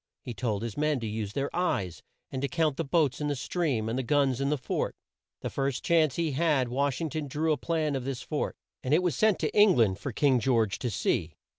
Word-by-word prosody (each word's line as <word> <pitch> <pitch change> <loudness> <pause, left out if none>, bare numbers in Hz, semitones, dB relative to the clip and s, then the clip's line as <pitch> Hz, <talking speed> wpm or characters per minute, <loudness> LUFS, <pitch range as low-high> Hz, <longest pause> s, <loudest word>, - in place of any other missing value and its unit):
He 120 - -5
told 110 -3 -2
his 115 -3 -5
men 150 -2 +1
to - - -3
use 105 -1 -4
their 140 0 -2
eyes, 100 - -1 0.3
and 130 - -3
to 140 - 0
count 160 -2 +1
the 165 - -2
boats 150 -2 +1
in 150 - 0
the 145 - 0
stream, 135 -6 -1
and 115 +3 -1
the - - +1
guns 135 0 +1
in 140 - +1
the 150 - +1
fort. 125 - -2 0.5
The - - -3
first 135 -1 -2
chance 160 -5 +3
he 165 -2 0
had, 140 -4 +1
Wash 135 +2 0
ing 160 -3 -2
ton 155 -2 -3
drew 155 +4 0
a - - -1
plan 155 0 -1
of 130 - -2
this 135 -1 -4
fort, - - -2 0.3
and 130 +4 +3
it 180 - +2
was 175 -3 +1
sent 215 -2 +3
to - - -1
Eng 205 -3 +6
land 100 -5 +2
for 140 - -4
King 130 +2 +3
George 115 -4 +1
to 125 - -2
see. 80 -6 -1
140 Hz, 250 wpm, -28 LUFS, 120-155 Hz, 0.5 s, Eng